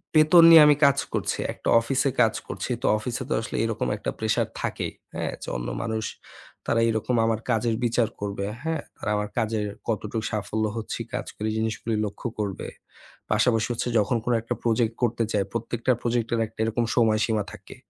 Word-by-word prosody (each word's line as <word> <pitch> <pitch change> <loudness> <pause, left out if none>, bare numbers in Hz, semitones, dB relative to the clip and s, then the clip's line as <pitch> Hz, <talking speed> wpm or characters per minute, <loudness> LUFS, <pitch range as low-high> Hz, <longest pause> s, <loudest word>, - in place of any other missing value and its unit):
বেতন 155 +2 +7
নিয়ে 165 -2 +10
আমি 150 - +6
কাজ 140 0 +4 0.2
করছি, - - -1 0.2
একটা - - -4
অফিসে 135 +4 +1
কাজ 110 -2 +4
করছি। - - -4
তো - - -3
অফিসে 125 +4 -4
তো - - +1
আসলে 115 - -6
এরকম 115 -1 -1
একটা - - -3
pressure 110 0 0
থাকেই, - - -3 0.2
হ্যাঁ? - - -2
যে - - -8
অন্য - - -5 0.2
মানুষ 110 -1 -2 0.6
তারা 115 - +2
এরকম 115 +2 0
আমার 115 -1 +1
কাজের 115 0 +1
বিচার 120 -1 +2
করবে, 100 -1 -3 0.2
হ্যাঁ? 160 -2 -1 0.2
তারা 105 - -3
আমার 105 0 -2
কাজের 110 -2 0 0.2
কতটুকু 110 0 -2
সাফল্য 110 +1 -1
হচ্ছি 110 - -4
কাজ - - -2
করে, 105 - -3
জিনিসগুলি 110 0 -1
লক্ষ্য 105 +4 -5
করবে। 100 -2 -3 0.6
পাশাপাশি 115 -2 +3
হচ্ছে 120 - -3
যখন 105 +4 +1
কোন 125 - +1
একটা 115 - -3
project 115 -1 +1
করতে 115 -1 +1
যাই, 100 -2 +2
প্রত্যেকটা 115 +2 -1
project 120 -1 0
এর 115 - +1
একটা 110 - -25
এরকম 115 +2 0
সময়সীমা 110 -2 +2
থাকে। - - -12
115 Hz, 180 wpm, -25 LUFS, 110-120 Hz, 0.6 s, নিয়ে